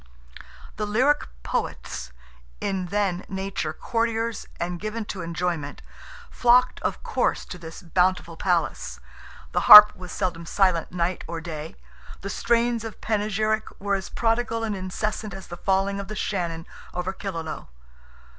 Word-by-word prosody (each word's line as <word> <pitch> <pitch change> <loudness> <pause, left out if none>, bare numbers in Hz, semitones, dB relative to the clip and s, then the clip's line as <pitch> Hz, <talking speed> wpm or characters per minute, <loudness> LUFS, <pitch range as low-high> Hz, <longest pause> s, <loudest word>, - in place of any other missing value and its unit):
The 210 0 -2
lyric 260 +8 +2 0.2
Poets, 60 +1 -3 0.5
in 190 -2 -2
their 195 -2 0
nature 190 -4 -3
courtiers 230 +5 -2
and 175 0 -3
given 215 +2 -4
to 195 -2 -5
enjoyment, 170 -3 -3 0.5
flocked, 250 +1 +4
of - - -2
course, - - 0
to 180 - -8
this 165 +1 -10
bountiful 180 0 +1
palace. 170 -2 -1 0.5
The - - +1
harp 210 0 +13
was 180 -1 -9
seldom 170 -2 -3
silent 185 -4 +2
night 175 0 -1
or 165 -1 -4
day, 160 -1 -7 0.5
the 195 - -4
strains 235 -1 +1
of 225 -1 -7
panegyric 215 0 0
were 200 0 -1
as 195 -2 -2
prodigal 230 0 0
and 215 -2 -1
incessant 195 +2 -3
as 190 - -9
the 175 - -8
falling 195 +1 +1
of 200 - -5
the 215 - -6
Shannon 170 -6 -2 0.3
over 180 +1 -2
Killaloe. 165 -6 -5
195 Hz, 140 wpm, -25 LUFS, 175-215 Hz, 0.5 s, harp